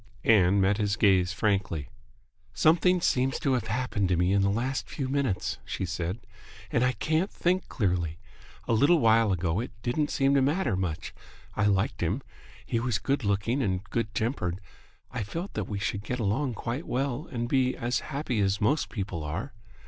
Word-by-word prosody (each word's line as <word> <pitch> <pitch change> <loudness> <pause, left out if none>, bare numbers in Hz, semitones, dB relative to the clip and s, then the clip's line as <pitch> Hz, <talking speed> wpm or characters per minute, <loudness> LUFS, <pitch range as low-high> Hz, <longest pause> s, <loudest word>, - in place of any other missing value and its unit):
Ann 100 -3 +5
met 95 +1 +3
his 105 -1 +1
gaze 95 -5 +3
frankly. 95 -6 -1 0.7
"Something 180 +3 +4
seems 130 -3 +1
to 135 - 0
have 125 -3 -1
happened 110 -4 -1
to 90 - +2
me 90 +2 +2
in 100 - +3
the 100 - +3
last 125 +6 -1
few 135 -3 -3
minutes," 130 -9 -1
she - - -3
said, 90 +4 -3 0.5
"and 120 - +2
I 125 0 +2
can't 160 +8 0
think 185 +1 0
clearly. 90 - -1 0.5
A - - +2
little 140 +10 +5
while 115 -5 +4
ago 90 0 0
it 120 - -3
didn't 145 +5 0
seem 135 0 +2
to 140 - +4
matter 140 - +1
much. 90 -4 -3 0.4
I 105 - +1
liked 100 0 +1
him. 100 +11 -1 0.4
He 115 - 0
was 120 -2 0
good 135 +5 -1
looking 100 +6 0
and 95 -5 -1
good 115 -2 -2
tempered. 95 -7 -1 0.5
I 125 - -3
felt 165 - -5
that - - -3
we 105 - -2
should 100 0 -2
get 125 +3 -3
along 115 +4 0
quite 120 +8 -4
well 135 +3 -2
and 120 -2 -2
be 130 0 +1
as 120 +1 0
happy 135 -5 -3
as 100 0 +1
most 140 +9 +1
people 95 -6 -4
are. 85 - -4
115 Hz, 185 wpm, -28 LUFS, 95-135 Hz, 0.7 s, Ann